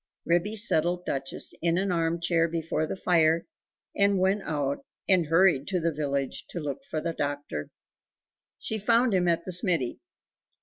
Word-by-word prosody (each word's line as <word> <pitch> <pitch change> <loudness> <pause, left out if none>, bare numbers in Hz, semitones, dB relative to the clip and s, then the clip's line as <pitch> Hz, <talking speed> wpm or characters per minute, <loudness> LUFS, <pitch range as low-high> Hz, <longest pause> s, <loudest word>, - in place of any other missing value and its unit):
Ribby 175 +5 +1
settled 175 -4 +2
Duchess 135 0 -3
in 170 +1 +2
an 195 0 0
armchair 170 0 +1
before 160 -1 -2
the - - -3
fire, 165 -3 +2 0.5
and 200 0 +3
went 190 +2 +2
out 140 -4 -2 0.2
and 180 -5 +3
hurried 165 -4 +4
to 185 -3 0
the 165 -1 0
village 140 -2 -2
to 175 - -5
look 145 -4 -5
for 155 - -2
the 165 +1 -3
doctor. 145 - -4 0.9
She 220 - -4
found 230 +2 +3
him 180 -2 +2
at 170 0 +1
the 185 - -4
smithy. 170 - 0
170 Hz, 160 wpm, -27 LUFS, 155-185 Hz, 0.9 s, hurried